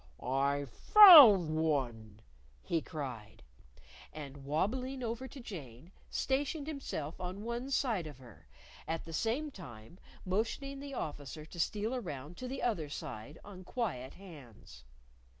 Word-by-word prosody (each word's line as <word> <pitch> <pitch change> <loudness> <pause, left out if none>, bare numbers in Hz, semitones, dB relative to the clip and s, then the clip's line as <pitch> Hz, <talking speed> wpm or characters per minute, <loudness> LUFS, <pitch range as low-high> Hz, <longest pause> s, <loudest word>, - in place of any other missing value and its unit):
"I 140 +3 0
found 220 - +9
one!" 120 -9 -2 0.4
he 165 - -1
cried. 125 -10 -7 0.7
And 145 -2 -9
wabbling 250 - -2
over 235 +3 -4
to 275 - -11
Jane, 165 - -10 0.2
stationed 280 +2 -1
himself 225 - -5
on 185 +3 -5
one 235 +3 -4
side 230 - 0
of 145 -4 -10
her, 120 - -16 0.4
at 165 0 -3
the 165 - -9
same 250 - -1
time 125 - -12 0.3
motioning 230 +8 -2
the 280 -1 -7
Officer 150 - -6
to 170 +2 -11
steal 210 +7 -1
round 150 - -7
to 255 - -6
the 265 +1 -5
other 175 -11 -1
side 135 0 -7
on 190 -2 -11
quiet 175 - -4
hands. 125 - -14
170 Hz, 130 wpm, -33 LUFS, -, 0.7 s, found